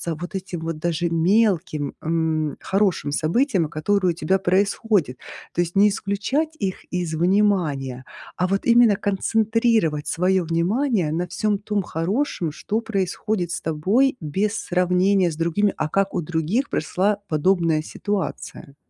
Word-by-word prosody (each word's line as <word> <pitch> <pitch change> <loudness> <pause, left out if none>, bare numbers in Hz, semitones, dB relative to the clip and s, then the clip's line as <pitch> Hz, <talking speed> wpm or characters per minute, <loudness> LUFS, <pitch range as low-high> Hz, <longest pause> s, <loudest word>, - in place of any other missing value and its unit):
вот 175 +5 -7
этим 185 -2 -5
вот 165 -1 -4
даже 170 +1 -1
мелким, 170 -4 +1
м, 160 -2 -1
хорошим 190 -6 0
событиям, 175 - +1
которые 185 +4 +1
у - - -3
тебя 170 +3 +1
происходят. 195 - +1 0.4
То - - +1
есть 175 +1 -3
не 200 +2 +6
исключать 220 +11 -2
их 190 -3 -3
из 175 -3 -2
внимания, 165 -8 +1 0.3
а 180 - +1
вот 195 +1 -1
именно 235 -3 +5
концентрировать 215 -5 +1
своё 185 +2 +1
внимание 180 - 0
на 175 +2 -2
всём 210 -1 0
том 210 0 -1
хорошем, 180 - -2
что 215 +8 -3
происходит 195 -3 -2
с - - -3
тобой 200 - +1
без 195 +8 -1
сравнения 180 +1 +2
с - - -6
другими: 170 +5 +1
"А 155 - -1
как 195 +4 0
у 180 - -1
других 170 - -1
прошла 200 +6 0
подобная 165 0 +2
ситуация?" 190 -5 -5
185 Hz, 140 wpm, -22 LUFS, 165-205 Hz, 0.4 s, не